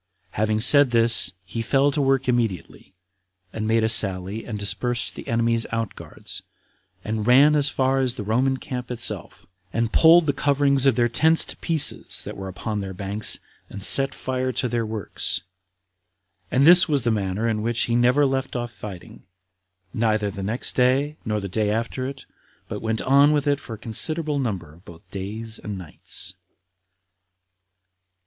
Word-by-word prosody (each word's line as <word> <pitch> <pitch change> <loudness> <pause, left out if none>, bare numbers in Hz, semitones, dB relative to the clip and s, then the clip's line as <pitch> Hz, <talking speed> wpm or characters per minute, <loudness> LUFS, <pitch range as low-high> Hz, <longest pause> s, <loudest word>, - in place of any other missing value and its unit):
Having 110 +1 -1
said 140 +3 +7
this, 115 -3 +3
he 115 +6 -5
fell 135 +5 +2
to 145 - -1
work 135 -1 +1
immediately, 115 - -3 0.6
and 110 -1 -4
made 110 0 +2
a - - +2
sally, 100 -1 +2
and 110 -3 -5
dispersed 120 +4 -2
the - - -10
enemies' 115 0 0
out 115 -2 -3
guards, - - -7 0.6
and 110 0 -3
ran 140 +5 +6
as 145 -1 +2
far 135 0 0
as 130 -2 -1
the 125 - -6
Roman 130 +6 0
camp 125 -3 -7
itself, 125 -2 -2 0.3
and 115 +2 -2
pulled 165 +1 +6
the 145 - 0
coverings 140 -1 +1
of 135 - +3
their 120 -1 +2
tents 160 +7 +2
to - - -9
pieces, 160 -3 0
that - - -8
were 95 0 -7
upon 105 +3 -5
their 95 -1 -7
banks, 100 +2 +1 0.3
and 100 -1 -7
set 135 +5 +5
fire 130 0 -3
to 125 +1 -1
their 115 -1 -2
works. 110 -3 -3 1.1
And 135 +2 +2
this 175 +1 +7
was 140 -4 +1
the 120 - +1
manner 105 +1 -2
in 110 -2 -1
which 115 +1 -1
he 115 - 0
never 125 +4 +3
left 135 -1 -2
off 120 -1 -4
fighting, 100 -6 -11 0.7
neither 110 -2 0
the 100 - -7
next 110 +6 -2
day, 135 +4 +1
nor 105 -1 -1
the 100 - -5
day 105 +2 -1
after 115 +4 -3
it, 135 0 -9 0.4
but - - -6
went 110 0 -2
on 140 +3 +4
with 145 -1 0
it 145 -1 +1
for 115 - -9
a - - -13
considerable 150 +7 0
number 95 - -4
of 85 +3 -20
both 85 +2 -15
days 110 +3 -6
and 105 -2 -6
nights. 90 -5 -4
115 Hz, 175 wpm, -23 LUFS, 105-135 Hz, 1.1 s, said